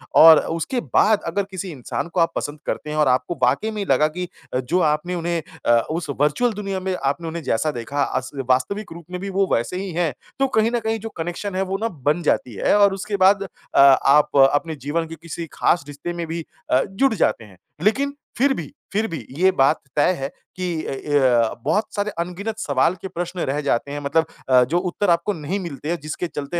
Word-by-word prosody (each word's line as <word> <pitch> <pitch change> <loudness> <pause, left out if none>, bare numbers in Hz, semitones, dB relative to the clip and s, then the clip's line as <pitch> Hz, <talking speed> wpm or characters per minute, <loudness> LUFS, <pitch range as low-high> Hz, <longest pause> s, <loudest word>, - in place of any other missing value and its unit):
और 160 -1 +10
उसके 165 - -2
बाद 215 -1 +4
अगर 200 +4 0
किसी 190 -1 -5
इंसान 135 +3 -4
को 175 +1 -3
आप 165 0 +3
पसंद 145 +1 -4
करते 150 - -3
हैं 150 - -3
और 150 - +4
आपको 130 +6 +1
वाक़ई 140 - +2
में 210 -2 -3
लगा 150 -1 +3
कि 180 +3 -5 0.3
जो 130 +8 0
आपने 160 +2 +1
उन्हें 170 0 -1 0.2
अ, 120 0 +5
उस 160 -2 -3
वर्चुअल 180 - +2
दुनिया 195 -2 -3
में 185 0 -2
आपने 145 +1 -2
उन्हें 165 0 -5
जैसा 150 +7 0
देखा 140 +4 -2
अस 130 -1 -3 0.2
वास्तविक 195 +12 0
रूप 170 -2 -11
में 180 - -4
भी 200 - -4
वो 195 0 +1
वैसे 120 +10 0
ही 195 0 -4
है। 165 -4 0 0.3
तो 270 - +3
कहीं 225 -2 +2
न - - +2
कहीं 225 0 -2
जो 225 +2 -6
कनेक्शन 175 +4 -4
है, 190 - 0
वो 195 0 -1
ना 225 +2 -1
बन 150 - -1
जाती 125 -5 0
है - - +2
और 200 -1 +5
उसके 200 +1 -3
बाद 195 +1 +5
अ, 190 - -4
आप 140 +1 +5
अपने 160 +2 -1
जीवन 165 +2 0
के 165 - -8
किसी 170 0 -6
ख़ास 170 - +2
रिश्ते 145 +4 -6
में 170 -1 -4
भी 165 0 -4 0.3
अ, 130 - +5
जुड़ 225 +6 +2
जाते 140 - +1
हैं। 100 -4 -16 0.3
लेकिन 280 +7 +2 0.2
फ़िर 270 +2 +3
भी 165 - -6 0.2
फ़िर 215 +2 +1
भी 155 -9 -6
ये 190 +2 +5
बात 135 +1 +3 0.2
तय 150 +4 +4
है 135 - -3 0.3
कि 175 -3 -2
अ, - - -3
य 130 -5 +2
बहुत 215 +1 +1
सारे 205 +1 -1
अनगिनत 200 +6 -3
सवाल 145 0 +1
के 190 - -4
प्रश्न 175 0 -5
रह 145 +2 0
जाते 140 -1 0
हैं। 145 - -3
मतलब 160 +3 +1 0.2
अ, 125 -1 +6
जो 165 +8 0
उत्तर 180 +2 -1
आपको 170 +4 +2
नहीं 170 +5 -3
मिलते 155 -4 -6
हैं, 175 - 0
जिसके 155 +3 -4
चलते 150 +3 -4
170 Hz, 220 wpm, -22 LUFS, 145-195 Hz, 0.3 s, और